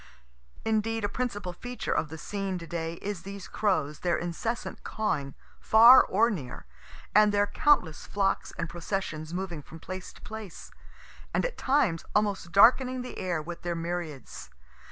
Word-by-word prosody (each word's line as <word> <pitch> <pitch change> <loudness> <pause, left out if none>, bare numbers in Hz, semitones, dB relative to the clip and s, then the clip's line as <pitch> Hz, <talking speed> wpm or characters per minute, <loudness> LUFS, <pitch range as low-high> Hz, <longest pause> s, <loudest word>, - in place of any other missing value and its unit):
Indeed 225 0 0
a - - +2
principal 205 -6 -3
feature 245 +7 -5
of 160 - 0
the 160 - -7
scene 195 +2 -3
to 170 - -7
day 165 -1 -4
is 205 -3 -3
these 195 +1 -8
crows, 155 -8 0
their 175 -1 +1
incessant 175 +8 -4
cawing, 145 -11 -2 0.2
far 235 +4 +8
or 230 +5 +2
near, 135 -11 -6 0.5
and 210 0 +6
their 205 0 +3
countless 190 - +2
flocks 195 -1 0
and 170 - -2
processions 170 -2 -4
moving 175 -3 -4
from 160 +3 -12
place 185 +2 -7
to - - -17
place, 220 -4 -9 0.6
and - - +2
at - - -3
times 260 - +1
almost 205 -4 0
darkening 255 +5 +5
the 250 - -7
air 175 -4 -2
with 170 +2 -7
their 175 -1 -2
myriads. 165 -4 -5
190 Hz, 155 wpm, -28 LUFS, 170-220 Hz, 0.6 s, far